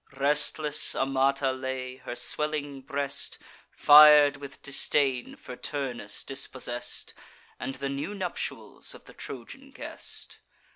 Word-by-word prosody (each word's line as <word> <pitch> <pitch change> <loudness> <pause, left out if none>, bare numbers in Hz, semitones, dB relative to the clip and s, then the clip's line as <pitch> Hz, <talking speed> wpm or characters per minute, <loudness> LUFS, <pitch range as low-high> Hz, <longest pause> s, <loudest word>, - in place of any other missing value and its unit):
Restless 150 +1 +1
Amata 135 0 +2
lay, 130 -1 -4
her 120 - -7
swelling 145 +1 -1
breast 140 0 -2 0.3
Fir'd 150 -1 +8
with 140 -1 -10
disdain 135 -2 +1
for 125 - -10
Turnus 130 -7 -4
dispossess'd, 130 -2 -3 0.5
And 135 - -4
the 140 +1 -4
new 145 +9 -4
nuptials 185 -3 -4
of - - -15
the - - -14
Trojan 140 - -9
guest. 270 - -9
140 Hz, 110 wpm, -28 LUFS, 130-150 Hz, 0.5 s, Fir'd